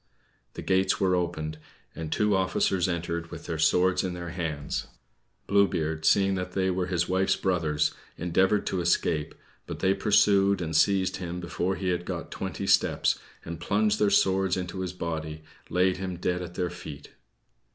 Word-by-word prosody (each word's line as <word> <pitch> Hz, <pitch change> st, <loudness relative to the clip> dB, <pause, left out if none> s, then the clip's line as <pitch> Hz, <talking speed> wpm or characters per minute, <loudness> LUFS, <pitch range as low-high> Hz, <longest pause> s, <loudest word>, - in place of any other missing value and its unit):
The -, -, -6 dB
gates 95 Hz, 0 st, +2 dB
were 95 Hz, -1 st, +3 dB
opened, 80 Hz, -3 st, -3 dB, 0.3 s
and 80 Hz, -1 st, -6 dB
two 105 Hz, -1 st, +2 dB
officers 95 Hz, -1 st, +1 dB
entered 85 Hz, -1 st, -3 dB
with -, -, -9 dB
their 80 Hz, -, -4 dB
swords 90 Hz, +3 st, +3 dB
in 90 Hz, -1 st, -3 dB
their 85 Hz, -1 st, -6 dB
hands. 80 Hz, -4 st, -3 dB, 0.6 s
Blue 100 Hz, 0 st, +4 dB
Beard, 80 Hz, -2 st, -2 dB
seeing 100 Hz, -1 st, +4 dB
they 95 Hz, 0 st, -1 dB
were 90 Hz, 0 st, -1 dB
his 90 Hz, -3 st, 0 dB
wife's 95 Hz, +1 st, +2 dB
brothers, 80 Hz, -5 st, 0 dB, 0.2 s
endeavored 95 Hz, +4 st, +2 dB
to 95 Hz, -, -1 dB
escape, 85 Hz, -3 st, 0 dB, 0.3 s
but -, -, -5 dB
they 95 Hz, 0 st, +2 dB
pursued 100 Hz, -1 st, +3 dB
and 80 Hz, -2 st, -3 dB
seized 95 Hz, +2 st, +3 dB
him 90 Hz, -1 st, -5 dB
before 90 Hz, +2 st, -2 dB
he 95 Hz, +1 st, -2 dB
had 90 Hz, -1 st, -1 dB
got -, -, -5 dB
twenty -, -, -4 dB
steps, -, -, +2 dB, 0.3 s
and, 85 Hz, 0 st, -6 dB
plunging 105 Hz, +4 st, +1 dB
their 105 Hz, -, +4 dB
swords 95 Hz, -1 st, +2 dB
into 90 Hz, 0 st, -4 dB
his 90 Hz, -1 st, -3 dB
body, 80 Hz, -3 st, -5 dB, 0.3 s
laid 90 Hz, +1 st, +2 dB
him 90 Hz, -1 st, -4 dB
dead 90 Hz, +1 st, -1 dB
at 90 Hz, 0 st, -7 dB
their 90 Hz, -1 st, -1 dB
feet. 80 Hz, -5 st, -9 dB
90 Hz, 170 wpm, -27 LUFS, 85-95 Hz, 0.6 s, Blue